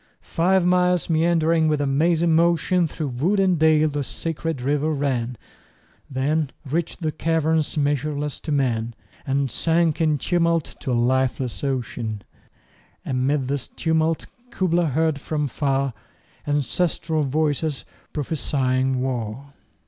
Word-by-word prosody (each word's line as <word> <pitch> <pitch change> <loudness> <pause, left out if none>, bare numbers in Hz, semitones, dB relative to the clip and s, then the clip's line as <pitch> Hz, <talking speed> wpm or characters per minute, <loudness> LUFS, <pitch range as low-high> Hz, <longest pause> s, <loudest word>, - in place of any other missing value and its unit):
Five 180 +2 +3
miles 180 -1 +2
meandering 165 0 +3
with 150 -1 +1
a 145 - +1
mazy 160 +5 +2
motion 170 +1 +3
25 - - -14
Through 155 - -1 0.2
wood 195 +4 +3
and 185 -4 +3
dale 155 -1 +4
the 145 -1 -2
sacred 165 +1 -3
river 145 +4 0
ran, 130 -5 -1 0.7
Then 145 +3 0 0.2
reach'd 165 +6 -2
the 155 - 0
caverns 160 -1 0
measureless 145 0 -1
to 155 - -5
man, 120 -5 0 0.3
And 135 -1 0
sank 165 -1 +1
in 155 -2 +3
tumult 170 0 0
to 130 - -3
a - - +1
lifeless 125 +1 0
ocean: 115 -6 -3 0.8
And 130 0 0
'mid 140 -2 +1
this 140 -1 -2
tumult 160 0 0 0.2
Kubla 175 -6 +1
heard 155 0 0
from 150 -1 -1
far 135 0 0 0.5
Ancestral 160 +2 0
voices 150 0 0 0.3
prophesying 130 -3 0
war! 130 +2 -4
150 Hz, 130 wpm, -23 LUFS, 135-165 Hz, 0.8 s, dale